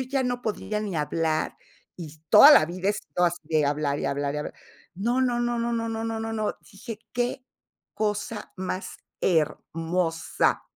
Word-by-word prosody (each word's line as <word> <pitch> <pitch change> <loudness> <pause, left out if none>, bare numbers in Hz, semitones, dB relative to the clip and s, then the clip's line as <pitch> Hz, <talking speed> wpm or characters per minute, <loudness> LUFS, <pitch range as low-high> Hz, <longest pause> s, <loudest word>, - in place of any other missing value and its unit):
ya 270 -1 +1
no 245 -1 -1
podía 210 -2 -3
ni 200 -6 -3
hablar, 155 +1 -1 0.4
y 160 -3 -9
toda 290 - +10
la 270 - +7
vida 180 +4 -3
he 205 - +2
sido 180 -4 -3
así 170 -1 -2
de 155 -3 +2
hablar, 145 0 0
y - - -2
hablar, 140 +1 -1
y - - -1
hablar. 150 - -5 0.4
No, 235 +7 0
no, 245 -2 +1
no, 240 0 0
no, 235 0 0
no, 230 0 -2
no, 225 0 -3
no, 225 0 -3
no, 215 -1 -1 0.2
dije, 215 +2 -8
qué 245 +1 -2 0.5
cosa 210 +1 -3
más 185 0 -4 0.2
hermosa. 165 0 0
200 Hz, 175 wpm, -26 LUFS, 165-230 Hz, 0.5 s, toda